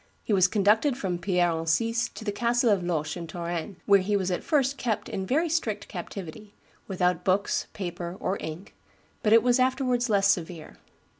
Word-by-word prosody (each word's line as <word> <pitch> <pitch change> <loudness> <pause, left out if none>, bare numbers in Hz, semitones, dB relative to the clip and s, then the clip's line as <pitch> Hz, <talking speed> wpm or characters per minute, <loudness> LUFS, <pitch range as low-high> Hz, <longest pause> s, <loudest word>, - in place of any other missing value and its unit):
He 215 - -1
was 185 -2 +5
conducted 220 +7 +2
from 180 -7 -2
Pierre 175 -1 +1
Encise 225 +9 0
to 220 - -8
the 205 - 0
castle 235 +2 +2
of 200 -3 +2
Loches 155 -4 -2
in 170 -1 -6
Touraine, 170 +3 -4
where 200 -1 +6
he 200 +2 0
was 190 -1 -1
at 180 - -2
first 280 -3 +1
kept 220 -4 -2
in 190 0 -4
very 315 - +2
strict 235 -11 -2
captivity, 195 +2 -8 0.3
"without 180 -2 0
books, 195 +2 +1
paper, 175 -2 -5
or 190 - -1
ink," 160 +5 -7 0.5
but 215 - +1
it 225 0 +7
was 245 +1 +3
afterwards 255 -1 +1
less 200 -2 +3
severe. 170 -2 -5
200 Hz, 180 wpm, -27 LUFS, 175-230 Hz, 0.5 s, it